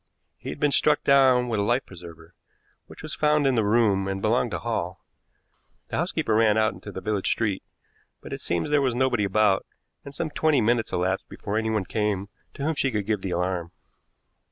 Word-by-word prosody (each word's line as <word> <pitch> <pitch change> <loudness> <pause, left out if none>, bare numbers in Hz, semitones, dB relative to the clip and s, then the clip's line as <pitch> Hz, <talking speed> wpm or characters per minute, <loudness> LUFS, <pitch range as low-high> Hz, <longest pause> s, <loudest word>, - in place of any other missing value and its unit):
He - - -7
had - - -6
been 145 - +2
struck 150 +1 +3
down 130 -3 +4
with 115 -3 -1
a - - +2
life 120 +6 +1
preserver, 85 -2 -13 0.5
which - - -13
was - - -6
found 150 -1 +2
in 135 - +3
the 115 -3 +2
room 105 -3 +2
and 95 0 -2
belonged 115 +4 +1
to 90 - -3
Hall. 95 -6 -4 0.8
The - - -3
housekeeper 110 - -1
ran 110 -1 +4
out 110 0 +2
into 105 - -10
the 95 - -7
village 105 -3 -1
street, 105 -5 0 0.6
but - - -9
it - - -6
seems 85 - -2
there 150 -1 +4
was 130 -3 0
nobody 125 -4 +1
about, 100 0 +2 0.4
and 140 0 -10
some 155 +1 -3
twenty 155 -2 +2
minutes 115 0 +1
elapsed 95 +2 -1
before 100 - -5
anyone 110 -2 0
came 105 -2 -2 0.3
to 140 - -6
whom 160 +2 +1
she 140 -2 0
could 105 -5 -2
give 105 -2 -1
the 95 - -4
alarm. 90 -1 -2
110 Hz, 200 wpm, -25 LUFS, 95-125 Hz, 0.8 s, down